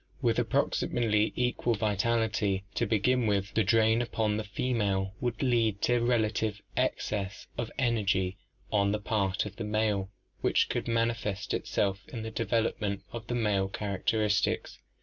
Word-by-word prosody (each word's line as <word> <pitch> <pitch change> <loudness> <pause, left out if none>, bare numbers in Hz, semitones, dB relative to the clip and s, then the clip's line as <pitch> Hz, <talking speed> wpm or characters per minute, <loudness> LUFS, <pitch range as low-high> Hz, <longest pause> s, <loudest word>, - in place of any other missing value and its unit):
With - - +2
approximately 110 -3 +1
equal 125 -1 +1
vitality 105 -2 +1
to - - 0
begin 120 +3 +2
with, 100 -1 0
the 110 - +3
drain 110 +3 +4
upon 110 -3 0
the 110 - -2
female 100 -3 -1
would 120 +1 -1
lead 115 -5 +2
to 120 0 +3
relative 110 -2 +1 0.2
excess 100 -1 -1
of 120 -1 -3
energy 100 -7 +1 0.4
on 100 -1 +2
the 105 - 0
part 100 -3 0
of 100 -1 -8
the 115 - -4
male 105 -2 0 0.3
which - - +2
could - - -2
man 115 0 +2
ifest 105 -4 -4
itself 100 -1 0
in 115 -3 -6
the 110 - -5
development 110 -3 -1
of 115 -1 -7
the 120 - -2
male 105 -4 +1
characteristics. 105 - 0
110 Hz, 150 wpm, -29 LUFS, 100-115 Hz, 0.4 s, drain